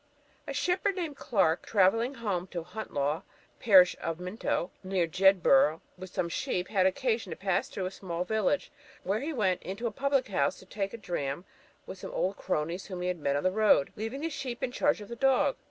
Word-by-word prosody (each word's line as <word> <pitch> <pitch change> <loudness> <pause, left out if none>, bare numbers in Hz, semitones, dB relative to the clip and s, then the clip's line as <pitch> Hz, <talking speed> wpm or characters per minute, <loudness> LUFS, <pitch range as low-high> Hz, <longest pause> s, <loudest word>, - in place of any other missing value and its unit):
A 280 - -3
shepherd 365 +5 +1
named 335 -6 -3
Clark, 195 - +1
travelling 225 +6 +2
home 200 -7 -2
to 175 -3 -5
Hunt 210 +6 -7
Law, 145 +3 0 0.4
parish 190 -6 +6
of 165 0 -3
Minto, 180 -1 -2
near 185 -2 +1
Jedburgh, 165 -4 +4 0.2
with 185 +1 -9
some 175 - -1
sheep, 180 +1 -2
had 190 -3 +3
occasion 230 +3 0
to - - -4
pass 190 -2 0
through 190 - -4
a 185 - -3
small 180 -3 -4
village, 220 +7 0 0.3
where 200 +3 0
he 290 +6 -3
went 195 - +1
into 195 +6 -5
a 230 - 0
public 275 +1 0
house 140 -8 +1
to - - -14
take 195 +2 -4
a - - -7
dram 170 -5 -3 0.4
with 190 - -8
some 185 +1 -2
cronies 175 -1 -3
whom 185 -2 -6
he 180 - 0
had 180 -2 -2
met 140 -2 0
on 145 - -1
the 185 - +3
road, 210 -8 +3
leaving 225 +6 -4
the 325 - -1
sheep 265 -4 -5
in 255 - -1
charge 285 -2 +1
of 205 - -9
the 235 - -6
dog. 270 +2 +3
195 Hz, 205 wpm, -29 LUFS, 180-235 Hz, 0.4 s, parish